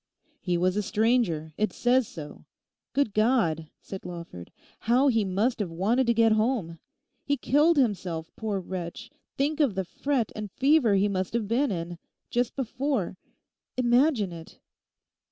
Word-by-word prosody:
'He 175 -2 -1
was 180 +2 +1
a 210 - +1
stranger; 210 -8 +1
it 215 - +1
says 250 -1 +2
so. 150 -3 -10 0.5
Good 280 -7 +1
God!' 195 - +2
said 195 - -7
Lawford, 170 - -8 0.3
'how 250 +5 +3
he 225 -4 +2
must 205 +6 0
have 200 -4 -1
wanted 215 +10 +1
to 235 - +4
get 225 0 +4
home! 215 -7 0 0.4
He 285 0 0
killed 295 +6 +3
himself, 185 - 0
poor 215 -3 -2
wretch, 180 +3 -6 0.3
think 290 +3 0
of 275 -10 +2
the 190 -1 -1
fret 260 +4 -1
and 210 -1 -5
fever 270 -6 +4
he 195 +1 +3
must 190 -1 -2
have 230 -3 -1
been 255 +6 +1
in—just 175 +7 -4
before. 265 -5 -2 0.6
Imagine 245 - +3
it. 165 -1 -11
215 Hz, 150 wpm, -27 LUFS, 180-255 Hz, 0.6 s, to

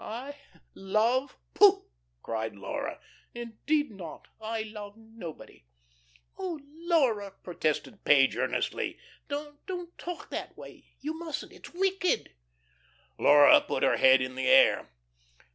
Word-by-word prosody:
"I? 250 +6 -6 0.4
Love? 225 +7 0 0.2
Pooh!" 400 -1 +6 0.4
cried 110 -1 -3
Laura. 100 - -5 0.4
"Indeed 240 +5 -1
not. 180 -6 -10
I 220 0 -3
love 210 -1 -9
nobody." 220 - -11 0.7
"Oh, 360 -5 -4
Laura," 270 - +1
protested 175 +3 -2
Page 135 -2 +5
earnestly. - - -2 0.3
"Don't, 290 0 -6
don't 355 -2 -6
talk 355 -1 -7
that - - -6
way. - - -12
You 315 +3 -4
mustn't. 330 -3 -5
It's - - -13
wicked." 380 0 0 0.9
Laura 145 0 +7
put - - -3
her - - +3
head 130 0 +6
in 130 0 -3
the 130 0 -2
air. - - +5
225 Hz, 120 wpm, -29 LUFS, -, 0.9 s, Laura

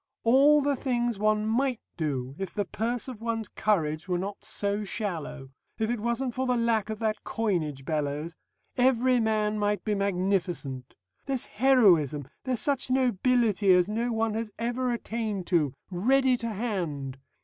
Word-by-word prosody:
All 280 +5 +6
the 285 0 +1
things 240 -4 -1
one 215 0 +2
might 245 +2 +1 0.2
do, 135 -5 -2
if 195 -2 -5
the 205 - 0
purse 235 +6 -2
of 245 -4 -8
one's 225 -2 -2
courage 160 -7 0
were 180 -1 0
not 195 +3 -5
so 205 +1 -1
shallow. 165 - -4 0.3
If 220 +1 0
it 240 - -1
wasn't 235 +3 -1
for 260 +2 -2
the 250 -1 +2
lack 230 -3 +1
of 215 - -3
that 220 -1 -2
coinage, 160 -11 -2
Bellows, 150 +1 -2 0.4
every 250 0 +3
man 215 -1 +1
might 205 -2 0
be 215 - 0
magnificent. 180 -9 -1 0.3
There's 265 -3 -1
heroism, 190 - +3 0.2
there's 255 -3 0
such 280 -3 0
nobility 240 -5 +2
as 180 0 +4
no 230 +3 -1
one 225 -1 0
has 220 0 -3
ever 245 +2 -1
attained 220 -5 -3
to, 150 -6 +2 0.2
ready 255 +8 +3
to 230 - -4
hand. 170 - -3
215 Hz, 160 wpm, -28 LUFS, 180-240 Hz, 0.4 s, All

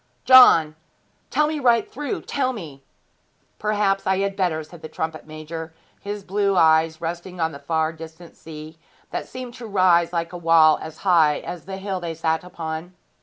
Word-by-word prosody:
'John! 200 -12 +7 0.5
Tell 300 - +2
me 305 0 -2
right 235 -4 +2
through 290 +3 -4
tell 260 -2 -1
me!' 150 - -10 0.8
'Perhaps 205 -2 0
I 190 0 +2
had 195 0 -1
better,' 175 -5 -1
said 160 +2 -14
the 155 - -8
trumpet 160 -1 -5
major, 160 +1 -8 0.2
his 205 0 -6
blue 200 +1 0
eyes 160 -1 +3
resting 175 +2 -6
on 160 -1 0
the 140 - -10
far 160 +2 -1
distant 165 +1 -12
sea, 155 0 -11 0.3
that - - -4
seemed 255 -1 -8
to 245 -2 -9
rise 180 -4 +3
like 170 0 -3
a - - -5
wall 165 -2 +5
as 160 0 -8
high 160 -5 +4
as 175 -3 -8
the 190 +1 -6
hill 195 -1 -4
they 170 -2 -5
sat 160 0 -1
upon. 165 0 -7
170 Hz, 175 wpm, -22 LUFS, 160-195 Hz, 0.8 s, John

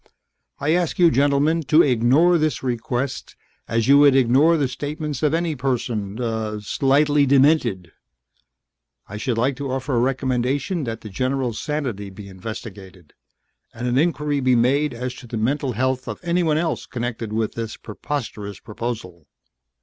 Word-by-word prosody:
I 145 +2 0
ask 175 -2 0
you, 175 -2 +5
gentlemen, 145 +4 +2
to 150 +6 +5
ignore 140 +8 +4
this 155 -2 -1
request 125 +1 -3 0.3
as 115 +1 0
you 140 +1 +7
would 145 -2 +6
ignore 135 +6 +4
the 140 -3 +1
statements 145 +2 -5
of 150 -2 +2
any 165 -2 -1
person... 120 -6 -2
er, 110 -3 -2
slightly 140 +6 +2
demented. 130 - +3 1.2
I 100 - -7
should 115 +1 -2
like 130 +4 +1
to 140 -2 -4
offer 130 +1 -3
a - - +3
recommendation 135 +5 0
that 115 -1 -5
the 110 - -8
general's 130 0 -2
sanity 130 -10 -3
be 100 +1 -11
investigated, 95 -3 -9 0.6
and 120 +2 -5
an 125 +2 +2
inquiry 150 -2 0
be 130 -1 +3
made 135 +4 +2
as 125 +1 -4
to 125 - -11
the 115 - -5
mental 130 +4 0
health 130 +2 -1
of 110 - -5
anyone 170 -3 +1
else 165 0 -2
connected 120 -3 -4
with 110 0 -1
this 115 -1 -5
preposterous 105 -3 -6
proposal!" 105 - -6
130 Hz, 155 wpm, -22 LUFS, 115-145 Hz, 1.2 s, you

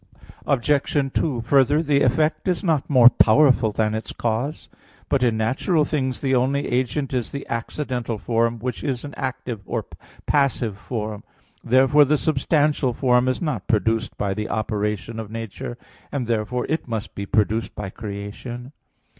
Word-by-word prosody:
Obj. 140 +1 +1
2: 135 -7 0
Further, 140 +5 +3
the 145 -2 +2
effect 150 +8 +1
is 180 +1 0
not 160 -6 +1
more 125 -4 +7
powerful 125 -1 +5
than 110 0 0
its 110 0 -4
cause. 120 +6 -2 0.4
But 140 -2 +2
in 120 -3 +2
natural 145 - +1
things 130 -4 -2
the 135 -1 0
only 130 +3 +1
agent 130 +3 -1
is 125 -3 -2
the 140 - -5
accidental 120 -1 -3
form, 115 +2 0
which 125 +2 -4
is 135 -2 -2
an 145 - -8
active 125 -4 -4
or - - -1
a - - -14 0.3
passive 125 -8 +1
form. 105 -3 -5 0.4
Therefore 135 +4 +5
the 150 +2 +2
substantial 145 -2 +1
form 125 0 +2
is 130 +6 -1
not 140 - -3
produced 115 +2 0
by 100 -1 -1
the 105 +2 -4
operation 105 0 -2
of 110 -2 -6
nature; 115 +1 -6 0.3
and 135 -4 -2
therefore 115 +2 -1
it 160 -1 -2
must 110 -3 -4
be 100 0 -5
produced 110 0 0
by 100 -2 -5
creation. 110 +5 -7
125 Hz, 160 wpm, -23 LUFS, 110-140 Hz, 0.4 s, more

